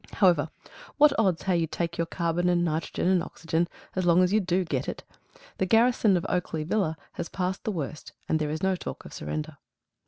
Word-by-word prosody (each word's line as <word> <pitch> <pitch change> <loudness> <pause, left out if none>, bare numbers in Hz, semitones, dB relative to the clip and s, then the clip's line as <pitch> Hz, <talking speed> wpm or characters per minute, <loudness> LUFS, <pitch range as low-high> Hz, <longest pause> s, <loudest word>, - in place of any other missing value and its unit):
However, 175 -6 +3 0.5
what 300 0 +6
odds 190 -6 +2
how 190 - +1
you 170 -2 +1
take 170 +1 -3
your 165 - +1
carbon 170 +1 0
and 175 -1 +2
nitrogen 160 +2 -1
and 185 -1 +4
oxygen, 165 0 -1 0.3
as 185 - 0
long 175 +1 +5
as 180 +2 +1
you 215 - +5
DO 185 -1 0
get 140 -6 -2
it? - - -6 0.6
The 190 - +1
garrison 225 -2 +4
of 170 - -3
Oakley 170 -3 -1
Villa 165 -2 0
has - - -5
passed 185 0 -3
the 215 - 0
worst, 155 -4 -5 0.2
and 160 - +1
there 150 -1 -1
is 155 +3 -4
no 190 0 +3
talk - - -7
of - - -10
surrender. 75 +1 -5
175 Hz, 210 wpm, -27 LUFS, 160-190 Hz, 0.6 s, what